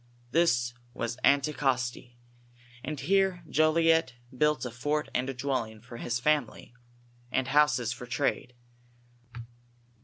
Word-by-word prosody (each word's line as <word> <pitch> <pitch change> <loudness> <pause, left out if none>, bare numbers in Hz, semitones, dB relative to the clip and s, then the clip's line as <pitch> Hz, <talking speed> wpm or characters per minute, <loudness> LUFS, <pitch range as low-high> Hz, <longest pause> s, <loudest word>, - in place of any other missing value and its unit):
This 120 -8 +2 0.2
was 115 +1 -4
Anticosti, 130 -4 +1 0.7
and 150 +1 -4
here 190 +3 +1
Jolliet 155 -3 +3 0.2
built 150 +1 +1
a 125 - -4
fort 145 +6 -2
and 130 +2 -1
a - - -2
dwelling 125 -5 -2
for 120 +2 -11
his 120 +1 -2
family, 145 -3 -1 0.6
and 130 0 0
houses 135 -5 +3
for 125 - -10
trade. 125 -1 -1
135 Hz, 115 wpm, -29 LUFS, 120-150 Hz, 0.7 s, Jolliet